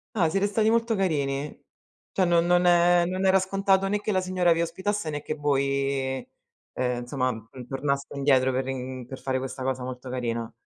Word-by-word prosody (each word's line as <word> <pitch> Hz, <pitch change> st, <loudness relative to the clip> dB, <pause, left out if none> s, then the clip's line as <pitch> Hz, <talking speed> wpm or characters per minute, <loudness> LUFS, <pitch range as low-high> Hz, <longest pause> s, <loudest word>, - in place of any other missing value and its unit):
Ah, 175 Hz, -6 st, +3 dB
siete 195 Hz, +5 st, +1 dB
stati 215 Hz, +1 st, +1 dB
molto 230 Hz, 0 st, +2 dB
carini. 145 Hz, -6 st, -1 dB, 0.5 s
Cioè, 185 Hz, -2 st, +2 dB
non 170 Hz, -1 st, +3 dB
non 175 Hz, 0 st, +3 dB
è 175 Hz, 0 st, +5 dB
non 185 Hz, +2 st, -2 dB
era 190 Hz, 0 st, +5 dB
scontato 195 Hz, 0 st, +1 dB
né 210 Hz, +1 st, +1 dB
che 210 Hz, -, -2 dB
la 185 Hz, -, +2 dB
signora 185 Hz, -2 st, +2 dB
vi 165 Hz, -, +1 dB
ospitasse 190 Hz, +1 st, -2 dB
né 145 Hz, -1 st, -4 dB
che -, -, -4 dB
voi, 140 Hz, -2 st, 0 dB, 0.5 s
ehm, 125 Hz, -1 st, -1 dB
insomma, 130 Hz, 0 st, -1 dB
uhm, 115 Hz, +2 st, -9 dB
tornaste 140 Hz, +1 st, -2 dB
indietro 130 Hz, -2 st, +3 dB
per 130 Hz, +1 st, -1 dB
rin 130 Hz, -1 st, -5 dB
per 130 Hz, +1 st, -8 dB
fare 130 Hz, -1 st, -1 dB
questa 130 Hz, 0 st, -5 dB
cosa 130 Hz, 0 st, -2 dB
molto 125 Hz, 0 st, -7 dB
carina. 115 Hz, -2 st, -3 dB
145 Hz, 190 wpm, -26 LUFS, 130-185 Hz, 0.5 s, è